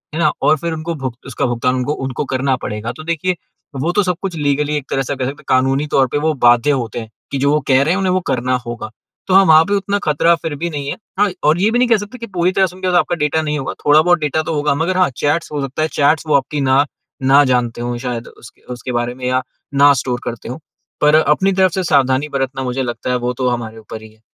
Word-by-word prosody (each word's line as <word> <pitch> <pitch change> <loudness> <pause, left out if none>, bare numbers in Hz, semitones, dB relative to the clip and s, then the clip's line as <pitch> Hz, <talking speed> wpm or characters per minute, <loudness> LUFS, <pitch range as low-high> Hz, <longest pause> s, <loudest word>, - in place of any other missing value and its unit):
है - - -2
ना? 155 -3 +3
और 155 - +4
फिर 165 +2 -3
उनको 160 +1 -4
भूग 130 -3 -3
उसका 135 - -2
भुगतान 125 +1 0 0.5
करना 130 0 +1
पड़ेगा। 105 -1 -4
तो 155 - -8
देखिए, 170 +3 -1 0.4
वो 145 +6 -1
तो 205 +3 +2
सब 180 -1 0
कुछ 190 -4 -4
लीगली 150 0 0
एक 140 - -5
तरह 135 - 0
से 140 - -3
कह 130 -1 -3
सकते 140 +3 -4
हैं, - - -28
कानूनी 135 +3 +2
तौर 135 -2 +2
पर 125 - -2
वो 160 - +2
बाध्य 120 +4 +4
होते 115 0 -5
हैं 110 - -8 0.2
कि 140 - -1
जो 140 +1 +2
वो 150 - +3
कह 130 -1 +4
रहे 155 - +1
हैं, 185 - 0
उन्हें 185 -1 +1
वो 185 - +2
करना 125 0 0
होगा। 120 -2 -6 0.4
तो 190 - +1
हाँ, 195 +1 +7
वहाँ 160 -2 +7
पर 200 - -2
उतना 200 +1 0
ख़तरा 160 +3 +3
फिर 160 -2 -5
भी 170 +4 -3
नहीं 145 -3 -5
है। - - -4 0.2
हाँ, 205 0 +4
और 155 +3 +3
ये 215 - +3
भी 240 - +1
नहीं 250 - +3
कह 230 - +5
सकते 205 +4 -8
कि 230 -1 -7
पूरी 175 +2 +3
तरह 190 0 +3
से 180 - -12
उनका 185 -1 0
आपके 175 - 0
डाटा 160 +2 0
नहीं 150 -1 -2
होगा। 135 - -4
थोड़ा-बहुत 155 +4 +5
डाटा 150 +1 0
तो 160 - -3
होगा, 145 -1 +1
मगर 170 +5 -1
हाँ, 185 - +3
चैट्स 150 +3 0
हो 145 -2 -2
सकता 135 +2 -4
है, 155 - +2
चैट्स 150 +2 +2
वो 155 - +3
आपकी 140 +1 0
ना 140 +2 +4 0.4
ना 140 +2 +6
जानते 125 -2 0
हों 120 0 -3
शायद 120 -2 -4
उस 115 - -14 0.2
उसके 125 0 -5
बारे 120 0 -1
में, 130 0 -7
या 130 0 +1 0.3
ना 140 +1 +6
स्टोर 125 -2 -3
करते 115 0 -6
हों। 125 - -5 0.4
पर 150 +1 +5
अपनी 160 +5 +3
तरफ़ 185 -1 +3
से 190 - -1
सावधानी 135 -2 +2
बरतना, 135 -1 -2
मुझे 130 +1 -2
लगता 120 0 -4
है, 125 - +1
वो 125 0 -2
तो 125 0 -2
हमारे 115 -2 -4
ऊपर 110 0 -9
ही 110 0 -13
है। 110 - -28
145 Hz, 265 wpm, -17 LUFS, 125-165 Hz, 0.5 s, हाँ